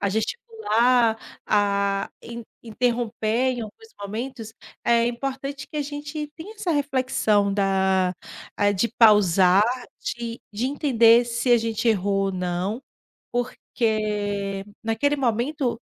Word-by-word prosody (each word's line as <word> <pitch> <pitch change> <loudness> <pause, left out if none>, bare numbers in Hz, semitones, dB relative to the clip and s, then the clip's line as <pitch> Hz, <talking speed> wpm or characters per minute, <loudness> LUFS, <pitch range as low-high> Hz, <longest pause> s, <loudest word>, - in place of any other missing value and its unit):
a 200 - +1
gesticular, 240 - +1 0.3
a 200 -1 +1
in 235 0 -8 0.2
interromper 235 +1 0
em - - -4
alguns 225 - -10
momentos, 225 +2 -6 0.3
é 235 0 +3
importante 270 +3 -4
que - - -8
a 295 - 0
gente 290 +1 -5
tenha 405 +7 -9
essa 370 -4 -3
reflexão 255 -8 +1
da 190 -2 +1 0.4
ah, 205 0 +3
de 205 +4 0
pausar, 195 -3 +6 0.4
de 235 0 -5
de 220 +5 -1
entender 245 -4 +4
se 235 +1 -2
a 240 - +7
gente 225 +1 -1
errou 195 -2 +1
ou 195 - -2
não, 185 +6 -2 0.5
porque 210 -5 -2 0.2
naquele 225 +6 +1
momento, 250 0 -1
230 Hz, 120 wpm, -24 LUFS, 205-255 Hz, 0.5 s, a